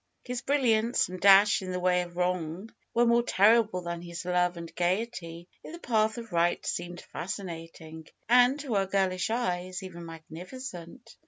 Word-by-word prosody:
His 250 -1 -4
brilliance 240 -7 +2
and 185 0 -8
dash 200 +1 +6
in 185 -1 -5
the 180 - -2
way 180 0 +2
of 175 0 -9
wrong 180 +3 -2 0.2
were 240 +1 +3
more 235 0 +4
terrible 220 -3 +3
than 170 0 -5
his 170 0 -7
love 180 -1 +1
and 170 -1 -8
gayety 175 -2 -2 0.2
in - - -10
the - - -7
path 220 -5 +1
of 230 -2 -8
right 170 0 +1
seemed 175 0 -4
fascinating, 165 -4 -7 0.2
and, 250 +4 +5
to 275 -5 -4
her 195 -1 +1
girlish 190 -1 0
eyes, 185 -6 -2
even 175 -2 -9
magnificent. 180 +6 -10
185 Hz, 165 wpm, -28 LUFS, 175-225 Hz, 0.2 s, dash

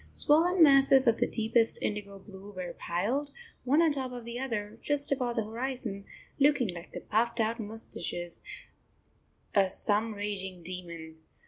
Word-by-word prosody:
Swollen 335 +4 +4
masses 275 -2 +6
of 230 -2 +3
the - - +2
deepest 225 0 +1
indigo 205 -1 -4
blue 195 +1 -12
were 185 -3 -6
piled, 230 +12 -2 0.3
one 290 +6 +4
on 325 - +4
top 265 -3 +2
of 245 -2 -8
the 235 +1 -5
other, 230 -4 -4
just 290 -1 0
above 250 -3 0
the 225 - 0
horizon, 225 -3 -4 0.3
looking 275 -5 +3
like 175 0 -7
the - - -7
puffed 235 +2 0
out 225 +1 0
moustaches 205 -5 -6 1.1
of 195 -2 +4
some 215 +3 0
raging 190 -3 -4
demon. 170 -3 -8
225 Hz, 150 wpm, -29 LUFS, 195-260 Hz, 1.1 s, masses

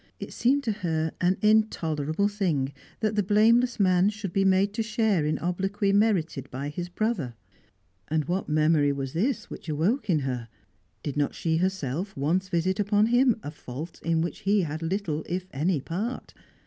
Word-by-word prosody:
It - - -7
seemed 275 +4 +2
to 230 - 0
her 160 -6 -1
an 185 +2 +2
intolerable 175 -6 +2
thing 170 -10 -1 0.3
that 215 -1 +1
the 210 - +2
blameless 225 +5 +3
man 185 0 +4
should 205 -4 -5
be 195 - +2
made 195 +1 +3
to 225 - -1
share 215 - +1
in 155 - 0
obloquy 195 +3 -1
merited 175 - +1
by 140 +3 -4
his 175 +4 -5
brother. 180 - -2 0.7
And 155 -1 0
what 180 0 -2
memory 155 -1 +3
was 135 -1 -4
this 225 +8 -1
which - - -8
awoke 200 - 0
in 160 -5 +3
her? 125 -3 -3 0.6
Did 145 -1 -4
not 145 -1 0
she 160 -1 0
herself 185 -1 -2
once 175 +7 0
visit 185 +3 0
upon 205 +1 +3
him 245 -2 +5
a 145 - -5
fault 150 +2 -8
in 165 -1 +1
which 170 +4 -3
he 205 0 +2
had 155 -1 -4
little 165 -3 -2
if 180 +1 -2
any 155 +4 +1
part? 200 - -4
180 Hz, 175 wpm, -27 LUFS, 155-205 Hz, 0.7 s, him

